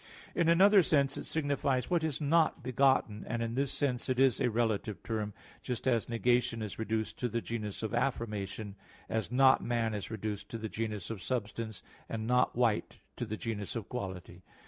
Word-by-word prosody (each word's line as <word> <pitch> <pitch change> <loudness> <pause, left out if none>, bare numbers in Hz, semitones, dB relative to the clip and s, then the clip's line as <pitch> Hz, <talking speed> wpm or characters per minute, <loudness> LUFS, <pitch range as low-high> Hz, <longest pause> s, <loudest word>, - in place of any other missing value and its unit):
In 170 -2 +2
another 195 +4 +7
sense 140 -5 +2
it - - -6
signifies 140 -2 0
what 170 -2 +2
is 155 -4 -1
not 155 -1 +2
begotten, 130 -4 +2
and 115 0 -1
in 115 0 -2
this 135 +2 0
sense 130 -3 -1
it 130 -1 +1
is 135 -3 +4
a - - +3
relative 110 -2 -1
term; 110 -2 -2 0.3
just 125 0 -3
as 120 -3 +2
negation 120 -1 +1
is 105 0 -6
reduced 110 0 -2
to 125 - 0
the 115 +2 -1
genus 110 -3 -4
of 110 - -3
affirmation, 105 -5 -2 0.3
as 110 0 -1
"not 130 +1 +5
man" 115 -2 0
is 105 -2 -4
reduced 110 -2 -4
to 115 - -4
the 110 -1 -4
genus 105 -3 -3
of 105 -5 -5
substance, 110 -1 -3 0.3
and 110 -1 -3
"not 125 +2 +2
white" 115 -3 +1 0.2
to 120 - -3
the 110 0 -3
genus 105 -2 -4
of 115 -4 -4
quality. 95 -6 -6
115 Hz, 190 wpm, -32 LUFS, 110-130 Hz, 0.3 s, another